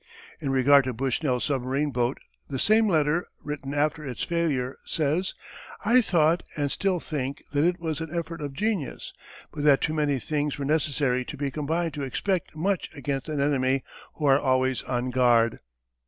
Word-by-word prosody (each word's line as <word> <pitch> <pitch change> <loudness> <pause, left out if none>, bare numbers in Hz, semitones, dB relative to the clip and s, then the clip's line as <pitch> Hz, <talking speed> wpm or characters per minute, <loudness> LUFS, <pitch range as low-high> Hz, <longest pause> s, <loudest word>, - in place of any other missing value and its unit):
In 145 -4 -3
regard 135 +1 +5
to 130 - -2
Bushnell's 130 +1 0
submarine 140 +1 0
boat 120 +1 0 0.3
the 135 - -3
same 220 - +4
letter, 160 -1 +2 0.2
written 145 -2 -5
after 150 +1 +1
its 125 -5 -4
failure, 145 -7 -1
says: 160 +5 -1 0.5
"I 245 +4 +6
thought 170 -5 +3 0.2
and 145 -2 0
still 190 -3 0
think 140 -3 -4
that 145 0 +2
it 175 +1 +2
was 165 -1 -3
an 160 - -4
effort 165 -1 -4
of 145 -2 -4
genius, 205 -6 -2 0.4
but 145 - -5
that 145 -2 +6
too 155 - -1
many 150 -3 +1
things 145 +3 -2
were 140 - -3
necessary 140 -4 +1
to 145 - -7
be 140 0 -2
combined 160 +3 -1
to 145 - -4
expect 175 +7 -2
much 185 +4 -1
against 140 0 -3
an 150 -2 -2
enemy 135 -2 +1 0.3
who 155 - -3
are 135 0 +5
always 130 -1 +1
on 125 0 -2
guard." 120 -2 +3
145 Hz, 175 wpm, -26 LUFS, 135-160 Hz, 0.5 s, I